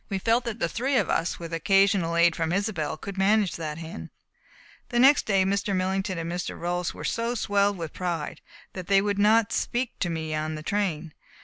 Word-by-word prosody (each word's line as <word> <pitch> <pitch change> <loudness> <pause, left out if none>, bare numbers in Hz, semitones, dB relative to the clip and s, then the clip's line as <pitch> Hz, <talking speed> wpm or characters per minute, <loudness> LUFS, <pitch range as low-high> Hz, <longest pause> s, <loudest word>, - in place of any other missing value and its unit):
We 195 - -1
felt 230 +5 +1
that 230 -2 -3
the 170 - 0
three 260 +9 0
of 205 - +1
us, 165 - 0
with 170 -1 -8
occasional 195 -1 +2
aid 170 0 +4
from 165 -1 -1
Isobel, 180 -6 -1
could 195 +3 -7
manage 205 0 +3
that 155 -2 -5
hen. 160 - -8 0.8
The 240 - -2
next 270 +4 +5
day 195 -2 +3
Mr. 200 +1 0
Millington 190 0 -1
and 165 0 -4
Mr. 175 +1 -4
Rolfs 175 0 -2
were - - -9
so 230 +1 -1
swelled 200 -2 +1
with 165 -3 -6
pride 175 -4 -4 0.3
that 185 -2 -7
they 195 0 +5
would 205 -1 -1
not 215 +1 +4
speak 240 0 -2
to 175 - 0
me 160 -1 -3
on 155 0 -2
the 155 - -7
train. 170 -5 -2
190 Hz, 205 wpm, -26 LUFS, 165-205 Hz, 0.8 s, next